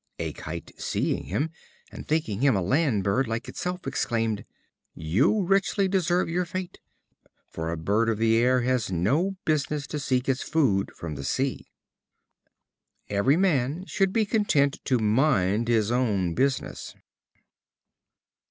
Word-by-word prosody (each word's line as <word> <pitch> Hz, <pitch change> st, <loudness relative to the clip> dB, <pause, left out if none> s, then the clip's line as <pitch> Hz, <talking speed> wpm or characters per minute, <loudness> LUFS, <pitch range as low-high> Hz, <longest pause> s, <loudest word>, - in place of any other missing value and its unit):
A -, -, -3 dB
Kite, 80 Hz, +1 st, -7 dB
seeing -, -, -1 dB
him, 155 Hz, +4 st, -2 dB, 0.4 s
and -, -, -9 dB
thinking 150 Hz, -9 st, -1 dB
him 135 Hz, -4 st, +4 dB
a 95 Hz, -, +1 dB
land 130 Hz, -, +1 dB
bird 120 Hz, +7 st, +1 dB
like 115 Hz, +1 st, -3 dB
itself, 180 Hz, 0 st, -4 dB
exclaimed: 115 Hz, -5 st, -1 dB, 0.5 s
"You 125 Hz, -, +2 dB
richly 195 Hz, +1 st, +2 dB
deserve 180 Hz, -2 st, +1 dB
your 175 Hz, +2 st, 0 dB
fate; 180 Hz, +1 st, -6 dB, 0.7 s
for 80 Hz, 0 st, -4 dB
a 85 Hz, -, -3 dB
bird 105 Hz, +8 st, +1 dB
of 110 Hz, -, 0 dB
the 115 Hz, 0 st, +3 dB
air 125 Hz, +2 st, +3 dB
has 125 Hz, -4 st, 0 dB
no 140 Hz, -, +1 dB
business 150 Hz, -2 st, 0 dB
to 150 Hz, -, -4 dB
seek 130 Hz, -2 st, 0 dB
its 135 Hz, 0 st, 0 dB
food 115 Hz, -12 st, +1 dB
from 85 Hz, -2 st, -6 dB
the 70 Hz, -1 st, -6 dB
sea." 130 Hz, -, -2 dB, 1.4 s
Every 105 Hz, +9 st, +2 dB
man 165 Hz, -2 st, +1 dB
should 195 Hz, -1 st, 0 dB
be 220 Hz, +1 st, +2 dB
content 175 Hz, -, +1 dB
to 130 Hz, -, +2 dB
mind 110 Hz, -2 st, +2 dB
his 115 Hz, -2 st, +2 dB
own 105 Hz, -9 st, +1 dB
business. 135 Hz, +6 st, -2 dB
130 Hz, 145 wpm, -26 LUFS, 105-160 Hz, 1.4 s, him